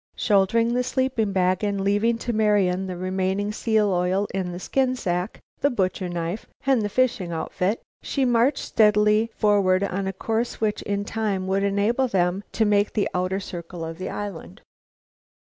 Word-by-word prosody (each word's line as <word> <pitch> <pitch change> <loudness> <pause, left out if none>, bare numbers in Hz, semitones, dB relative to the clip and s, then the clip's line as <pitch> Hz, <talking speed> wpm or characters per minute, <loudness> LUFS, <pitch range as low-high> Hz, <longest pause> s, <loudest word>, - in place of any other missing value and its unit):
Shouldering 230 +3 +2
the 250 +1 +1
sleeping 255 -5 0
bag, 185 0 +1
and 200 -1 0
leaving 205 +4 +2
to 240 +1 -3
Marian 200 -4 +2
the 180 -1 -5
remaining 190 +2 -1
seal 215 -2 +1
oil 180 +2 +1
in 185 -2 -2
the 175 - -6
skin 255 +6 0
sack, 180 -3 -2 0.2
the 285 - +2
butcher 190 -5 -1
knife, 175 +4 -4 0.2
and 265 -4 +3
the 205 - -1
fishing 240 -6 0
outfit, 180 +5 -2 0.2
she 275 -2 -1
marched 245 +3 +2
steadily 210 +1 +3
forward 200 -3 +3
on 195 0 -2
a - - -1
course 225 +5 -2
which 215 -2 0
in 200 0 -2
time 210 -4 -2
would 190 +1 0
enable 205 +6 +1
them 185 -2 0
to 220 - +2
make 205 0 +2
the 205 -2 +1
outer 185 +2 -1
circle 170 -2 -7
of 165 +1 -7
the 185 - -4
island. 200 -1 -7
200 Hz, 170 wpm, -24 LUFS, 185-225 Hz, 0.2 s, and